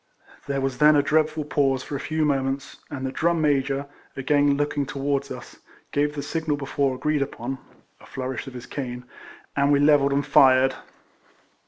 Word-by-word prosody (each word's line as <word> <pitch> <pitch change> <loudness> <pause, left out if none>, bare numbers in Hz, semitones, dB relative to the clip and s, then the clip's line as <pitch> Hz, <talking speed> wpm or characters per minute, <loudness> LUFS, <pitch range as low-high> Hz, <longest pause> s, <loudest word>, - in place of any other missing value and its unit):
There 140 -1 -1
was 135 -1 -2
then 150 0 +6
a 145 - +4
dreadful 155 0 +1
pause 135 -3 +1
for 145 - -6
a - - -3
few 155 +1 -1
moments, 135 -1 -1
and 135 -2 -5
the 130 - -2
Drum 170 +4 +1
Major, 140 -2 +1 0.3
again 145 +1 +2
look 145 0 -1
ing 140 -2 -1
towards 140 0 -2
us, - - -9 0.3
gave 145 +1 0
the 145 - -4
signal 155 0 -2
before 135 -1 -1
agreed 150 +2 0
upon 135 -1 -4 0.4
(a - - -16
flourish 130 0 -5
of 130 - -9
his 125 - -8
cane), 125 -3 -6 0.5
and 140 0 +3
we 140 - +4
levelled 145 -1 +4
and 140 0 +1
fired. 130 -2 +5
140 Hz, 180 wpm, -24 LUFS, 135-145 Hz, 0.5 s, then